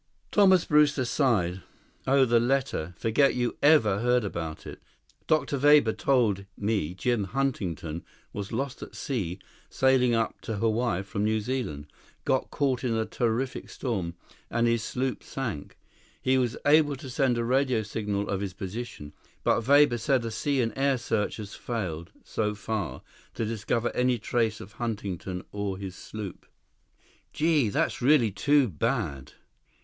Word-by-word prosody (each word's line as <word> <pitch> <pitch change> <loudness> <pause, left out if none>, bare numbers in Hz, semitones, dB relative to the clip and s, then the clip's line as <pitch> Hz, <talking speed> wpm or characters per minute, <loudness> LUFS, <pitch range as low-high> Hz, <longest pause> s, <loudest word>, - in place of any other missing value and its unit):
Thomas 190 -4 +5
Brewster 150 -3 +3
sighed. 105 - +1 0.5
"Oh, 135 0 +5
the 120 -1 +4
letter. 120 -9 0
Forget 125 +5 +2
you 120 -1 -1
ever 140 -10 +5
heard 125 +1 +2
about 80 -5 -5
it. - - -9 0.5
Dr. 150 -3 +1
Weber 145 -5 +6
told 110 -8 +1
me 100 -6 -1
Jim 105 +2 0
Huntington 95 - -2 0.3
was 100 0 -5
lost 135 +3 -3
at - - -9
sea 95 -10 -3 0.3
sailing 130 -2 +3
up 115 -1 -1
to 110 - -4
Hawaii 110 -2 0
from 100 +1 -3
New 110 +1 +2
Zealand. 105 - -3 0.4
Got 130 - +1
caught 135 -3 0
in 120 -3 0
a 110 0 0
terrific 120 +3 -2
storm, 95 -10 -3 0.3
and 120 0 +1
his 115 -1 +2
sloop 130 +3 -2
sank. 115 - -5 0.4
He 130 - +2
was 125 -1 0
able 145 0 +5
to 135 - -10
send 130 -1 +1
a 120 - 0
radio 130 -2 +2
signal 105 -1 -2
of 100 -1 -2
his 100 -2 -3
position, 95 -5 -7 0.3
but 115 - +1
Weber 140 -4 +5
said 120 +2 +1
a 115 - -3
sea 135 +4 0
and 115 -2 -1
air 135 0 +2
search 115 -3 -1
has 105 -2 -7
failed, 90 -9 -4
so 105 -1 -2
far, 105 -3 -4 0.3
to 115 - -1
discover 115 +2 -1
any 125 0 +2
trace 110 -1 0
of 95 - -10
Huntington 100 -5 -4
or 100 -2 -3
his 95 -1 -7
sloop." 105 -2 -8 0.9
"Gee, 150 -6 +2
that's 100 - 0
really 125 -4 +4
too 140 +8 +3
bad. 70 - -2
115 Hz, 155 wpm, -27 LUFS, 100-130 Hz, 0.9 s, Weber